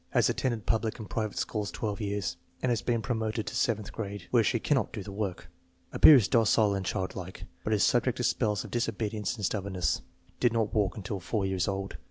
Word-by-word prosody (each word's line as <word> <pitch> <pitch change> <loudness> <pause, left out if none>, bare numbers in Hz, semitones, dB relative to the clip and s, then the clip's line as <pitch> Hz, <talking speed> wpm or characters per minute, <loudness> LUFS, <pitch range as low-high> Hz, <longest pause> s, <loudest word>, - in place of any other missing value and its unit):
Has - - +4
attended 120 -5 -2
public 110 -1 0
and 110 -4 -8
private 110 -1 -3
schools 105 -2 -2
twelve 105 0 -3
years 100 -3 -2 0.3
and 125 - +2
has 115 - +1
been 115 -2 0
promoted 110 -1 -1
to - - -5
seventh 110 -4 0
grade, 100 -2 -5
where 120 -2 +5
she 115 - +2
cannot 135 +3 +1
do 105 - -5
the 100 - -8
work. 100 -2 -4 0.5
Appears 130 -10 +8
docile 110 -2 +4
and 100 -1 -2
childlike, 95 -1 -4 0.2
but - - -2
is - - +3
subject - - +2
to - - -2
spells 105 -3 +1
of - - -10
disobedience 110 -2 -1
and 105 -4 -3
stubbornness. 95 -2 -1 0.4
Did 120 -2 +3
not 110 -4 0
walk 105 -3 +1
until 100 -1 -4
4 100 +2 -1
years 95 -1 0
old. 95 0 -3
105 Hz, 205 wpm, -29 LUFS, 100-115 Hz, 0.5 s, Appears